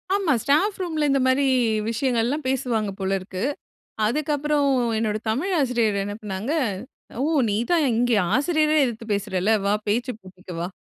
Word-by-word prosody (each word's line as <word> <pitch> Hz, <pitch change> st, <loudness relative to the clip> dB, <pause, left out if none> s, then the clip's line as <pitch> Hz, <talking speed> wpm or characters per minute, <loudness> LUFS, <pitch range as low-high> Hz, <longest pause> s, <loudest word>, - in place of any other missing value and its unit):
ஆமா. 370 Hz, -8 st, +2 dB
ஸ்டாஃப் 375 Hz, +9 st, +2 dB
ரூம்ல 315 Hz, -4 st, 0 dB
இந்த 275 Hz, 0 st, +3 dB
மாரி 270 Hz, +2 st, +3 dB, 0.4 s
விஷயங்கள் 230 Hz, 0 st, 0 dB
எல்லாம் 290 Hz, +4 st, -2 dB
பேசுவாங்க 235 Hz, -5 st, -1 dB
போல 190 Hz, 0 st, -1 dB
இருக்கு. 185 Hz, +1 st, -6 dB, 0.6 s
அதுக்கு 300 Hz, +7 st, -1 dB
அப்புறம் 290 Hz, 0 st, +1 dB, 0.3 s
என்னோட 215 Hz, -1 st, 0 dB
தமிழ் 305 Hz, -, -1 dB
ஆசிரியர் 235 Hz, -6 st, +1 dB
என்ன 205 Hz, +1 st, -4 dB
பண்ணாங்க 210 Hz, +6 st, -3 dB, 0.7 s
''ஓ -, -, +1 dB, 0.2 s
நீ 205 Hz, -, 0 dB
தான் 345 Hz, -2 st, +4 dB
இங்கே 240 Hz, +1 st, +2 dB, 0.2 s
ஆசிரியறே 310 Hz, +2 st, +2 dB
எதிர்த்து 230 Hz, -2 st, -4 dB
பேசுறல்ல. 200 Hz, -1 st, -1 dB
வா 200 Hz, -, +2 dB, 0.2 s
பேச்சு 245 Hz, +4 st, 0 dB
போட்டிக்கு 185 Hz, -1 st, -12 dB
வா.'' 175 Hz, -, -3 dB
245 Hz, 155 wpm, -23 LUFS, 210-295 Hz, 0.7 s, தான்